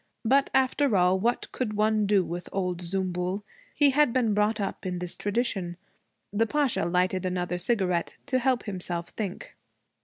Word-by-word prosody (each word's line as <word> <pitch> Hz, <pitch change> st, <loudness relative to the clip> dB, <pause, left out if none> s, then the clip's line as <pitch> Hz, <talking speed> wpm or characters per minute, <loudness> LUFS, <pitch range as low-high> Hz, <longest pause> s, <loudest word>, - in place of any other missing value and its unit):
But 270 Hz, +4 st, +4 dB
after 265 Hz, -3 st, +3 dB
all, 180 Hz, +1 st, +3 dB
what 240 Hz, +5 st, 0 dB
could 235 Hz, -5 st, -2 dB
one 215 Hz, 0 st, +2 dB
do 200 Hz, -3 st, +3 dB
with 175 Hz, +1 st, -6 dB
old 180 Hz, -2 st, -2 dB
Zümbül? 185 Hz, +2 st, -2 dB, 0.3 s
He 290 Hz, -2 st, +5 dB
had 295 Hz, -1 st, +4 dB
been 230 Hz, -4 st, +2 dB
brought 210 Hz, +2 st, +1 dB
up 195 Hz, -1 st, -3 dB
in 180 Hz, -1 st, -3 dB
his 180 Hz, -1 st, -4 dB
tradition. 200 Hz, -5 st, -2 dB, 0.6 s
The 225 Hz, +2 st, +2 dB
Pasha 280 Hz, -, +1 dB
lighted 180 Hz, +1 st, +1 dB
another 180 Hz, -1 st, -2 dB
cigarette 180 Hz, -4 st, 0 dB
to 260 Hz, -2 st, +1 dB
help 255 Hz, -1 st, +1 dB
himself 175 Hz, -4 st, -4 dB
think. 200 Hz, -4 st, -6 dB
200 Hz, 160 wpm, -27 LUFS, 180-235 Hz, 0.6 s, He